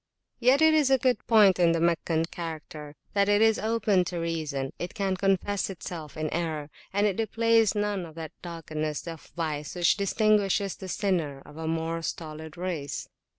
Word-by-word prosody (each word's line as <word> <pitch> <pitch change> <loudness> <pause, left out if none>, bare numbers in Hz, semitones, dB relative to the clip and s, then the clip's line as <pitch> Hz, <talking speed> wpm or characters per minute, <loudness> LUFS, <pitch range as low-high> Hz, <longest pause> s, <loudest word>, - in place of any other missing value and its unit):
Yet 260 +5 +4
it 315 0 +6
is 300 -3 +4
a 265 - +5
good 255 0 +2
point 210 -5 +6
in 170 -1 +5
the 165 - +1
Meccan 165 -1 +1
character, 155 -3 -7 0.2
that 200 0 +3
it 205 0 +4
is 220 0 +4
open 215 -4 +2
to 175 - -4
reason, 155 -5 -2
it 175 - -5
can 195 -2 0
confess 195 +1 0
itself 170 -5 -7
[p.237] 155 - -4
in - - -6
error, 160 -3 -2 0.2
and 205 +2 +2
it 200 -3 +1
displays 225 -1 +3
none 205 -4 -1
of 160 - -14
that 160 -2 -6
doggedness 155 -3 -4
of 165 -2 -9
vice 155 -3 -3
which 175 0 +3
distinguishes 200 -1 +2
the 190 - -8
sinner 165 -9 -1
of 150 - -14
a 160 0 -4
more 165 +1 -1
stolid 160 0 -6
race. 170 -6 -4
175 Hz, 185 wpm, -27 LUFS, 160-205 Hz, 0.2 s, it